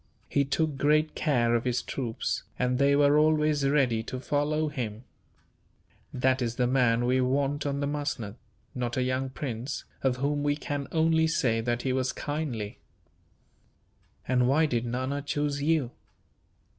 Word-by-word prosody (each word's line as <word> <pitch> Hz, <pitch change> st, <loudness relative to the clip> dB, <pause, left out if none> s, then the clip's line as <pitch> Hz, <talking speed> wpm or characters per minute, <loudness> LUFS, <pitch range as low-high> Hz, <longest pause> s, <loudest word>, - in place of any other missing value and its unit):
He 140 Hz, -1 st, +1 dB
took 150 Hz, +1 st, 0 dB
great 155 Hz, +2 st, +2 dB
care 120 Hz, -6 st, +1 dB
of 120 Hz, -1 st, +1 dB
his 125 Hz, -1 st, 0 dB
troops, 120 Hz, -4 st, -3 dB, 0.2 s
and 125 Hz, 0 st, 0 dB
they 140 Hz, 0 st, +4 dB
were 145 Hz, +1 st, +5 dB
always 150 Hz, -2 st, +3 dB
ready 130 Hz, -6 st, +2 dB
to 125 Hz, +3 st, -6 dB
follow 150 Hz, +3 st, 0 dB
him. 120 Hz, -6 st, -5 dB, 1.1 s
That 130 Hz, 0 st, +1 dB
is 120 Hz, -1 st, -1 dB
the 125 Hz, -, +1 dB
man 120 Hz, -2 st, +2 dB
we 130 Hz, +1 st, +2 dB
want 140 Hz, +3 st, 0 dB
on 140 Hz, 0 st, -2 dB
the -, -, +1 dB
musnud; 145 Hz, -8 st, -3 dB, 0.4 s
not 120 Hz, -1 st, -3 dB
a 130 Hz, -, +2 dB
young 130 Hz, +1 st, -1 dB
prince, 130 Hz, 0 st, -5 dB, 0.2 s
of 130 Hz, -2 st, +1 dB
whom 145 Hz, +2 st, 0 dB
we 145 Hz, 0 st, +1 dB
can 145 Hz, -2 st, -4 dB
only 160 Hz, 0 st, +3 dB
say 120 Hz, -8 st, +1 dB
that 120 Hz, +1 st, -1 dB
he 130 Hz, -, 0 dB
was 130 Hz, 0 st, 0 dB
kindly. 145 Hz, -9 st, -4 dB, 1.5 s
"And 125 Hz, -1 st, +3 dB
why 150 Hz, +5 st, +4 dB
did 120 Hz, -5 st, -1 dB
Nana 130 Hz, +4 st, -2 dB
choose 145 Hz, 0 st, -2 dB
you?" 150 Hz, -5 st, +1 dB
135 Hz, 155 wpm, -28 LUFS, 125-145 Hz, 1.5 s, were